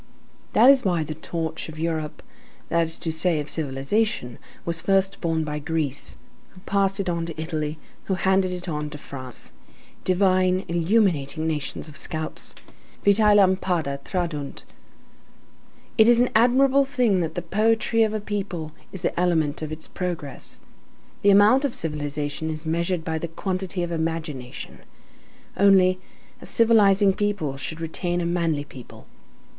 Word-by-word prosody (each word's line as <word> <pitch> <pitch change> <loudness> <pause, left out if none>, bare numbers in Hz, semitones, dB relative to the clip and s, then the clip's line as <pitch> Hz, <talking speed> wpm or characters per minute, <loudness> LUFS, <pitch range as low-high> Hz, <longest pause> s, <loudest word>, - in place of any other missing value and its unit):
That 245 +5 +8
is 270 -2 +3
why 175 -5 +1
the 155 0 -5
torch 160 +1 -4
of 155 - -10
Europe, 160 -2 -3 0.5
that 170 0 +2
is 160 - -5
to 165 - -3
say 160 0 +1
of 150 - -3
civilization, 140 - -1 0.3
was 165 -1 -1
first 195 0 +1
borne 165 -2 0
by 150 -1 -3
Greece, 145 -2 -3 0.4
who 185 - -14
passed 195 0 0
it 195 - -2
on 170 -1 -1
to 160 -2 -7
Italy, 155 -1 -3 0.3
who 190 - 0
handed 190 0 +2
it 180 0 -6
on 150 -2 -3
to 150 - -8
France. 130 -4 -8 0.5
Divine, 185 0 +2
illuminating 170 -4 +1
nations 155 0 -2
of 150 - -9
scouts! 155 -1 -2 0.5
Vitælampada 190 -7 +3
tradunt. 165 -6 -3 1.4
It 220 +1 +7
is 240 -1 +5
an 245 - +3
admirable 260 +4 +5
thing 250 -8 +1
that 165 -2 -2
the 175 - -3
poetry 225 +5 +2
of 220 -1 +2
a - - 0
people 195 -6 -4 0.2
is 190 -2 -7
the 170 - -1
element 160 -5 +1
of 155 -1 -4
its 155 0 -7
progress. 175 -7 -5 0.6
The 200 - +4
amount 205 +7 +6
of 280 -4 -1
civilization 150 0 -3
is 155 0 -5
measured 170 +1 -1
by 160 0 -2
the 170 - -3
quantity 185 +1 -3
of 170 - -3
imagination. 160 -6 -4 0.8
Only, 190 -2 +5 0.4
a - - -10
civilizing 205 -4 +4
people 200 -9 -1
should 160 +4 -6
remain 175 +2 -2
a 170 - -1
manly 170 -4 0
people. 130 -4 -13
170 Hz, 150 wpm, -24 LUFS, 155-195 Hz, 1.4 s, That